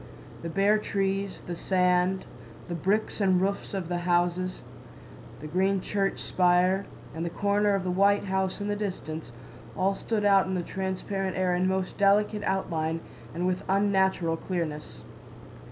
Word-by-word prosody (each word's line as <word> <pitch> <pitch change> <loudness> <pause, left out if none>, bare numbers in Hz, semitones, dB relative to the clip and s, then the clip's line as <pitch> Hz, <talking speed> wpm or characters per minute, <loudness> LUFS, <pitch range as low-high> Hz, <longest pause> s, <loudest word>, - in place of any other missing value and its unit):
The 165 - -4
bare 200 +5 +3
trees, 195 -1 -2
the 175 - -4
sand, 180 +1 +1 0.4
the 175 - -4
bricks 200 +6 0
and 190 -2 +4
roofs 200 +1 -2
of 185 -4 -3
the 175 0 -1
houses, 175 +1 0 0.8
the - - -7
green 190 +5 +1
church 195 +1 -1
spire, 180 +2 +2 0.3
and 160 - -4
the 170 - -1
corners 205 +2 +1
of 190 - -4
the 185 - -1
white 200 +2 +3
house 190 0 -1
in 205 - -3
the 205 - 0
distance, 165 - -5 0.5
all 195 +1 +2
stood 210 +1 -2
out 195 -2 +5
in 190 - -1
the 180 - -1
transparent 190 +1 -3
air 185 -1 +2
in 180 +1 +1
most 190 0 -2
delicate 205 +1 +3
outline 165 -4 -1 0.3
and 175 +2 -1
with 185 0 0
unnatural 190 -4 +2
clearness. 165 -4 -4
190 Hz, 155 wpm, -27 LUFS, 180-195 Hz, 0.8 s, out